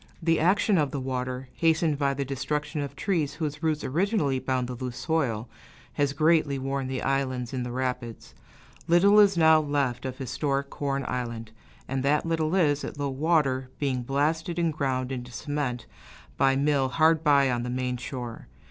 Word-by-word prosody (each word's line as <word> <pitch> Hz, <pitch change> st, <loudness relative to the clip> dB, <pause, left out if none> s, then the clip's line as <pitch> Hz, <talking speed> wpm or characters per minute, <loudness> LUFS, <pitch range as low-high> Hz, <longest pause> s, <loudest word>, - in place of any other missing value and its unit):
The 165 Hz, -1 st, +2 dB
action 190 Hz, +3 st, +3 dB
of 145 Hz, -2 st, +1 dB
the 140 Hz, -, -4 dB
water, 130 Hz, 0 st, -3 dB
hastened 160 Hz, -2 st, +1 dB
by 140 Hz, -1 st, +1 dB
the 140 Hz, 0 st, -2 dB
destruction 150 Hz, +3 st, -3 dB
of 140 Hz, -, -5 dB
trees 170 Hz, -8 st, -1 dB
whose 150 Hz, -2 st, -4 dB
roots 155 Hz, -2 st, 0 dB
originally 160 Hz, -, 0 dB
bound 130 Hz, -1 st, -1 dB
the 125 Hz, -, -5 dB
loose 125 Hz, 0 st, -5 dB
soil, 125 Hz, -9 st, -1 dB, 0.5 s
has 145 Hz, -1 st, +1 dB
greatly 155 Hz, -1 st, +3 dB
worn 135 Hz, 0 st, -2 dB
the 130 Hz, -1 st, -3 dB
islands 130 Hz, -3 st, -1 dB
in 130 Hz, -, -2 dB
the 125 Hz, 0 st, -4 dB
rapids. 125 Hz, -2 st, -4 dB, 0.5 s
Little 195 Hz, +5 st, +6 dB
is 200 Hz, -3 st, +5 dB
now 160 Hz, -1 st, +6 dB
left 140 Hz, -4 st, -1 dB
of 130 Hz, 0 st, -6 dB
historic 140 Hz, +1 st, -2 dB
Corn 140 Hz, -1 st, -2 dB
Island, 115 Hz, -3 st, -4 dB, 0.4 s
and 135 Hz, 0 st, -2 dB
that 145 Hz, +4 st, +2 dB
little 165 Hz, 0 st, 0 dB
is, 150 Hz, -6 st, +2 dB
at -, -, -6 dB
low 145 Hz, -1 st, -1 dB
water, 135 Hz, -3 st, +1 dB
being 135 Hz, -3 st, -1 dB
blasted 155 Hz, +6 st, -1 dB
and 165 Hz, -2 st, +1 dB
ground 130 Hz, -3 st, -1 dB
into 125 Hz, -1 st, -5 dB
cement 130 Hz, -2 st, -3 dB, 0.5 s
by 135 Hz, 0 st, +3 dB
a -, -, 0 dB
mill 140 Hz, -2 st, +2 dB
hard 160 Hz, +3 st, +3 dB
by 140 Hz, -3 st, +4 dB
on 120 Hz, -1 st, -1 dB
the 125 Hz, -, -4 dB
main 125 Hz, 0 st, -2 dB
shore. 120 Hz, -2 st, -7 dB
140 Hz, 180 wpm, -27 LUFS, 130-155 Hz, 0.5 s, Little